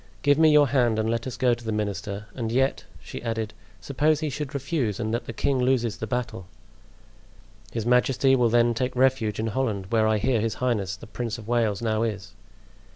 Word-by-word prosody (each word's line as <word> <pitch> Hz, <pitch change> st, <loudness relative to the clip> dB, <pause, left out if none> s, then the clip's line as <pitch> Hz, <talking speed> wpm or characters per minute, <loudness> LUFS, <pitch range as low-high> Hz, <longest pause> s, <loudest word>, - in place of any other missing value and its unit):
Give 145 Hz, +1 st, +4 dB
me 160 Hz, -1 st, +6 dB
your 150 Hz, -2 st, +5 dB
hand 120 Hz, -4 st, +2 dB
and 110 Hz, +1 st, 0 dB
let 115 Hz, +2 st, -2 dB
us 130 Hz, -, -6 dB
go 125 Hz, -2 st, +3 dB
to 120 Hz, 0 st, -6 dB
the 110 Hz, -, -3 dB
minister; 100 Hz, -1 st, -3 dB
and 115 Hz, -3 st, -3 dB
yet," 135 Hz, +3 st, +1 dB, 0.2 s
she -, -, -8 dB
added, 115 Hz, -2 st, -3 dB, 0.3 s
"suppose 150 Hz, +2 st, +1 dB
he 155 Hz, -2 st, -2 dB
should 145 Hz, +1 st, -5 dB
refuse 135 Hz, -, -1 dB
and 110 Hz, -1 st, -2 dB
that 120 Hz, -, -2 dB
the -, -, -5 dB
king 135 Hz, +3 st, 0 dB
loses 125 Hz, -3 st, +1 dB
the 110 Hz, -, -5 dB
battle?" 115 Hz, -6 st, -3 dB, 1.2 s
"His 115 Hz, -2 st, -3 dB
majesty 130 Hz, +2 st, +3 dB
will 120 Hz, -2 st, +3 dB
then 120 Hz, +1 st, +3 dB
take 125 Hz, +2 st, -2 dB
refuge 125 Hz, -4 st, +2 dB
in 110 Hz, -, -1 dB
Holland, 110 Hz, -7 st, -1 dB
where 110 Hz, -2 st, +3 dB
I 110 Hz, 0 st, +2 dB
hear 115 Hz, +1 st, +1 dB
his 115 Hz, 0 st, -1 dB
highness 105 Hz, -7 st, -1 dB
the 95 Hz, -, -12 dB
Prince 120 Hz, 0 st, -4 dB
of 110 Hz, -2 st, -11 dB
Wales 115 Hz, -3 st, 0 dB
now 110 Hz, -1 st, 0 dB
is." 105 Hz, -4 st, -3 dB
120 Hz, 210 wpm, -25 LUFS, 110-130 Hz, 1.2 s, me